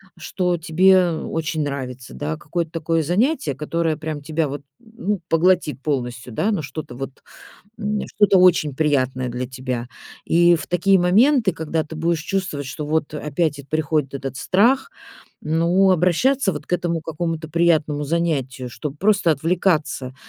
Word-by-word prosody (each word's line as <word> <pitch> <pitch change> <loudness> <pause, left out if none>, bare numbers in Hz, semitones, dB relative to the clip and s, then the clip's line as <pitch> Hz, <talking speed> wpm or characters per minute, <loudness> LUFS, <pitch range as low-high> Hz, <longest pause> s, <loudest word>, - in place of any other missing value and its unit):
что 180 -2 -1
тебе 180 +2 +4
очень 160 -1 -2
нравится, 130 -3 -5
да, 155 +2 -4
какое-то 165 +2 -3
такое 165 0 0
занятие, 180 - 0
которое 160 +1 -1
прям 155 -2 -5
тебя 155 +1 -1
вот, 140 +1 -5 0.2
ну, 220 -4 -4
поглотит 165 -4 +2
полностью, 125 -4 -3
да, 200 - 0
но 195 -7 -1
что-то 140 -2 -7
вот, 135 +1 -7 0.6
м, 210 -1 -1
что-то 205 -2 +5
очень 170 -6 +4
приятное 130 -4 0
для 125 +1 -4
тебя. 125 -1 -4 0.4
И 175 +1 +5
в - - -7
такие 190 +2 +3
моменты, 220 +5 +4
когда 160 0 -2
ты 160 - -10
будешь 165 0 0
чувствовать, 175 -6 -3
что 145 +3 -5
вот 155 -1 -1
опять 150 0 -1
эт 140 - -17
приходит 155 -2 0
этот 135 -1 -5
страх, 240 - +2 0.5
ну, 170 +5 +3
обращаться 190 - +2
вот - - -7
к - - -8
этому 170 -2 0
какому-то 160 0 -4
приятному 155 -3 +1
занятию, 140 -6 -1
чтоб 135 +5 -6
просто 195 -3 +3
отвлекаться, 155 -4 0
160 Hz, 150 wpm, -21 LUFS, 145-180 Hz, 0.6 s, что-то